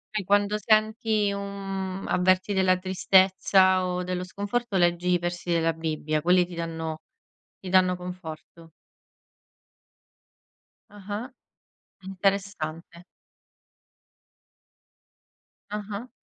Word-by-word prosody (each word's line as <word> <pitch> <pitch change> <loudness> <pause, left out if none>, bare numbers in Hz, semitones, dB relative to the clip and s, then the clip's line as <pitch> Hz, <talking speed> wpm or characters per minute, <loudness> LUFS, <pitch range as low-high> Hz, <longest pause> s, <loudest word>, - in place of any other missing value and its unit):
E 205 - 0
quando 205 +2 +2
senti 215 0 +2
un 195 -1 -5
avverti 185 +2 +2
della 185 -1 +3
tristezza, 185 0 +3
o 180 0 -2
dello 180 0 -3
sconforto 205 +3 -3
leggi 175 0 +2
i 180 - +4
versi 175 0 -5
della 165 -1 +2
Bibbia, 155 -1 -2
quelli 180 +1 +4
ti 175 - -12
danno 165 -1 -4 0.6
ti 185 - -8
danno 185 -1 +4
conforto. 170 -2 -9 2.2
Ah-ah, 205 +5 -7 0.7
interessante. 185 -3 -3 2.7
Ah-ah. 210 +3 -5
185 Hz, 90 wpm, -26 LUFS, 175-200 Hz, 2.7 s, i